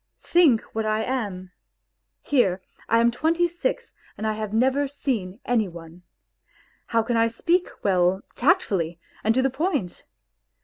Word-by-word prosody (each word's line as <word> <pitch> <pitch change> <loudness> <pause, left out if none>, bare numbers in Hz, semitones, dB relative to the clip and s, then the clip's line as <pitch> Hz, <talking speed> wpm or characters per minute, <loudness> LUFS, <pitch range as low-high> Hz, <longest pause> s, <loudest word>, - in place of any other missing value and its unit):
Think 315 -10 +4
what 220 - -1
I 215 0 +1
am! 200 -8 -3 0.7
Here, 200 -10 +2 0.3
I 230 - +4
am 235 0 +4
twenty 330 +7 +1
six 485 +8 -3 0.2
and 220 - -4
I 215 - +1
have 215 -1 -4
never 265 +5 +2
seen 235 -8 -3
any 230 -4 +1
one. 170 0 -11 0.9
How 230 -1 +1
can 235 +1 0
I 230 0 +4
speak 340 +10 0
well, 185 0 +2
tactfully, 195 - +1 0.2
and 220 +1 +2
to 260 - +3
the 270 - +1
point 270 - -2
230 Hz, 145 wpm, -24 LUFS, 195-285 Hz, 0.9 s, Think